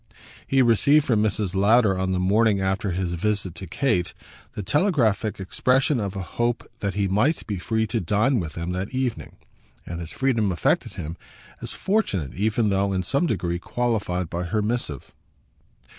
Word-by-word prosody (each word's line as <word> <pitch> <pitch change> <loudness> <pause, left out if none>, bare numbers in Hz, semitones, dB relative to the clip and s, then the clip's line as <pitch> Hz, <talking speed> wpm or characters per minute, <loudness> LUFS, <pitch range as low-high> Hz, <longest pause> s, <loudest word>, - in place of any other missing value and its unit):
He 135 -1 +4
received 140 +6 +4
from 110 -4 +2
Mrs. 105 -3 0
Lowder 100 +1 +4
on 95 0 -1
the 95 - 0
morning 100 +3 +3
after 95 +1 0
his 90 -1 -2
visit 100 0 -1
to 90 +3 -8
Kate 90 - 0 0.4
the 105 - -5
telegraphic 120 - +1
expression 130 +8 +1
of 100 -2 -3
a 95 - -3
hope 120 +5 -2
that 100 -2 -2
he 100 -1 +1
might 110 - +1
be 100 -4 -3
free 110 +4 0
to 110 +2 -1
dine 105 - +2
with 80 -4 -4
them 85 +1 -4
that 95 +7 -4
evening; 130 -3 -2 0.5
and 85 0 -6
his 85 -2 -6
freedom 115 -7 +1
affected 85 - 0
him 80 +2 -6 0.4
as - - -3
fortunate 100 - -1
even 105 +2 +1
though 100 0 +1
in 95 -1 0
some 140 - +1
degree 85 - -1
qualified 100 -6 -1
by 85 +2 -3
her 105 +4 0
missive. 105 - -3
100 Hz, 175 wpm, -24 LUFS, 90-120 Hz, 0.5 s, He